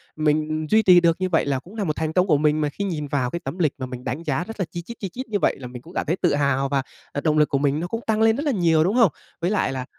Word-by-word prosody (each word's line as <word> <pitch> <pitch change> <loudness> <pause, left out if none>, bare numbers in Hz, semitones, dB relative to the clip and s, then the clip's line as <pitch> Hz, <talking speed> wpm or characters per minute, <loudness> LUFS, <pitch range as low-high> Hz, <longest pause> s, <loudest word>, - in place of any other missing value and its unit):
mình 155 0 0
duy 220 0 +5
trì 180 -2 +7
được 165 -1 +3
như 185 - 0
vậy 165 - +2
là 135 -2 0
cũng 185 +10 -15
là 210 - -2
một 155 -4 -1
thành 160 0 -2
công 185 +1 +3
của 150 -4 +4
mình 150 +1 +2
mà 150 - +1
khi 200 - -5
nhìn 155 -6 -3
vào 135 -3 0
cái 170 - -4
tấm 180 - -5
lịch 155 -4 +2
mà 130 - -4
mình 125 -1 -8
đánh 135 +6 -4
giá 150 +2 -1
rất 225 +2 -9
là 190 - 0
chi 170 - -5
chít, 235 +7 -10
chi 195 - -4
chít 255 +7 -7
như 205 -2 0
vậy - - +2
là 125 - -7
mình 125 -1 -9
cũng 170 +5 -14
cảm - - -2
thấy 165 +4 0
tự 170 -6 +2
hào, 140 -1 +1
và, 140 -1 +1 0.3
à, 145 - -3
động 155 -1 +1
lực 150 - +4
của 140 - +1
mình 140 +1 +1
nó 175 - -3
cũng 230 +4 -4
tăng 220 0 +1
lên 225 0 +5
rất 285 - -3
là 290 - +2
nhiều, 165 -6 +3
đúng 195 +7 0
không? 225 - +5 0.3
Với 175 +4 0
lại 205 - +1
là 130 -1 -4
160 Hz, 350 wpm, -23 LUFS, 145-185 Hz, 0.3 s, trì